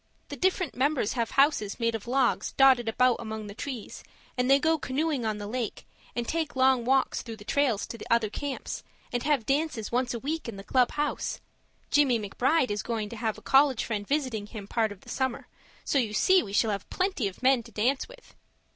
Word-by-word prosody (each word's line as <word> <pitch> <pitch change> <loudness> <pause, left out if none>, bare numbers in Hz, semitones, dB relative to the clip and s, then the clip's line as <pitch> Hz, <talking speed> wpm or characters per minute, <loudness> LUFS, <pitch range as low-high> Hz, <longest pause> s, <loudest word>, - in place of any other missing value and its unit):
The - - -5
different 370 -1 0
members 270 -4 +1
have 235 -3 -1
houses 275 -8 +2
made 230 -1 +1
of 225 0 -5
logs 255 0 +1
dotted 260 -4 +5
about 250 +2 +3
among 220 -1 -5
the 200 - -8
trees, 250 0 -6 0.3
and 250 0 0
they 275 - +7
go 320 +2 +1
canoeing 275 -3 -1
on 215 -1 -1
the 205 - -6
lake, 230 0 -4 0.3
and 240 0 -2
take 320 -3 -2
long 260 -2 +3
walks 265 +1 +2
through 225 -2 -8
trails 225 0 0
to 230 - -8
other 230 -3 +2
camps, 285 +2 -4 0.3
and 245 - 0
have 280 -5 +1
dances 275 -6 -1
once 245 0 0
a - - -3
week 300 +1 -3
in 225 - -7
the 195 - -8
club 250 +3 +2
house 295 0 -2 0.5
Jimmie 280 -5 +4
McBride 250 +6 +1
is 205 0 -1
going 220 -1 -3
to 235 - -7
have 220 -1 -2
a - - -14
college 270 -2 +4
friend 205 -3 -3
visiting 255 -8 -1
him 210 -3 -8
part 220 -1 0
of 200 -2 -11
the - - -15
summer, 260 -2 -2 0.4
so 280 - +2
you 220 -4 -1
see 375 - +5
we 200 - -7
shall 215 +2 +2
have 200 -1 -4
plenty 370 - 0
of 195 +6 -9
men 260 -1 +4
to 230 0 -15
dance 245 +6 0
with. - - -16
245 Hz, 210 wpm, -28 LUFS, 220-275 Hz, 0.5 s, they